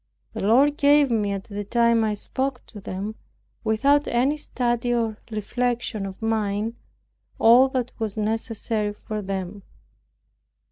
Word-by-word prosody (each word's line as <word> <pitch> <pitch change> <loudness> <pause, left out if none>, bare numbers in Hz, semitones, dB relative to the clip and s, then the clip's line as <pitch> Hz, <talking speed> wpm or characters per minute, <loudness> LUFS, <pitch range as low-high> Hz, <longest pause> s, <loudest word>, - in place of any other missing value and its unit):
The - - -5
Lord 270 +8 +4
gave 285 -1 +4
me, 210 -3 +1
at 195 -1 -3
the 205 0 -6
time 235 +2 +3
I 215 -1 0
spoke 260 +4 -3
to 210 - -11
them 195 +3 -5 0.5
(without 275 +7 +2
any 255 +5 +2
study 240 -4 -1
or 225 -2 -1
reflection 230 -1 -2
of 190 0 -9
mine) 220 0 -1 0.6
all 245 +4 +6
that 255 -2 -2
was 220 -2 -3
necessary 215 0 -2
for 210 0 -6
them. 195 0 -5
225 Hz, 135 wpm, -24 LUFS, 210-245 Hz, 0.6 s, all